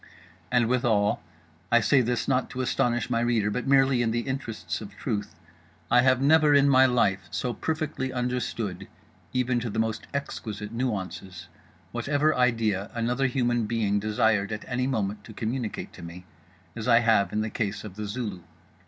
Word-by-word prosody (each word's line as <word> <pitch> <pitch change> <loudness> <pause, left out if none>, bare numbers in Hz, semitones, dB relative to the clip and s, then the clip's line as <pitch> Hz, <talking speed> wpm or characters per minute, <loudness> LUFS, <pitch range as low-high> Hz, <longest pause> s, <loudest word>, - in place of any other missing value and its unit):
And 125 -2 +3
withal—I 100 - 0
say 130 +5 +4
this 120 0 -1
not 130 -1 +1
to 130 - -4
astonish 120 -1 0
my 115 - +2
reader 115 -3 +1
but 125 +5 -3
merely 135 -2 +4
in 115 - +1
the 120 +1 0
interests 130 -3 -4
of - - -10
truth—I 105 +3 -2
have 130 0 +4
never 150 +1 +5
in 140 0 +5
my 130 -1 +6
life 100 -6 +1
so 125 - -2
perfectly 155 0 -3
understood 120 -6 -3 0.4
(even 125 -1 +1
to 120 0 -3
the 110 - -5
most 110 -1 -1
exquisite 110 -7 -5
nuances) 105 -6 -4 0.4
whatever 150 +2 +1
idea 115 -5 +1
another 125 +3 +1
human 120 -3 0
being 105 -3 +1
desired 105 0 +1
at 110 - -5
any 125 0 -1
moment 105 -5 -2
to 110 - -11
communicate 115 +1 -4
to - - -12
me, 85 +2 -9 0.5
as 115 0 -5
I 120 -1 +6
have 110 -4 +3
in 105 - 0
the 110 0 -3
case 100 -3 -3
of 105 -4 -9
The 105 0 -5
Zulu. 105 -4 -4
115 Hz, 165 wpm, -26 LUFS, 105-125 Hz, 0.5 s, my